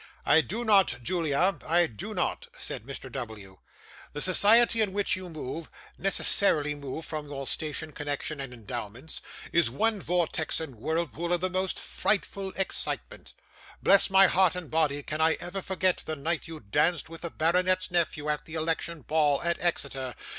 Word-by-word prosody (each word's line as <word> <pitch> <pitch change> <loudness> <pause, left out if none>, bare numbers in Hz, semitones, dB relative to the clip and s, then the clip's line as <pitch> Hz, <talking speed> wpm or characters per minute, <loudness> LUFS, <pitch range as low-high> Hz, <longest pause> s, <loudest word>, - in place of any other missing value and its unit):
'I 160 - +6
do 225 +9 -4
not, 200 -4 +4
Julia, 170 +4 +1
I 170 +2 +4
do 110 -10 -7
not,' - - -2
said 105 - -4
Mr. 135 -1 -7
W. 110 -7 -7 0.5
'The 145 - -4
society 225 +6 +6
in 205 -3 +1
which 205 0 +2
you 185 -1 -6
move 155 0 -6 0.3
necessarily 175 -6 +2
move, 145 +2 -6
from 155 -2 -5
your 135 -1 -6
station, 155 +2 -3
connection, 145 0 -4
and 135 -2 -6
endowments 120 +4 -7 0.3
is 170 -8 +4
one 215 - 0
vortex 175 -2 0
and 160 -5 -5
whirlpool 165 +7 -3
of 175 - +2
the 185 0 -1
most 185 0 0
frightful 195 -2 -1
excitement. 190 - -2 0.5
Bless 200 0 +6
my 195 0 +7
heart 185 -1 +3
and 180 -4 -7
body, 150 -3 +1
can 155 +3 -3
I 160 0 +4
ever 195 +2 -5
forget 185 -1 +1
the 155 - -4
night 160 +3 -2
you 160 -1 -8
danced 150 - +1
with 165 0 -10
the 170 - -3
baronet's 180 +4 +1
nephew 165 -4 0
at 150 -1 -1
the 160 - -8
election 160 -1 -2
ball, 150 -1 +2
at 170 0 0
Exeter! 135 -7 -2
160 Hz, 170 wpm, -28 LUFS, 145-185 Hz, 0.5 s, my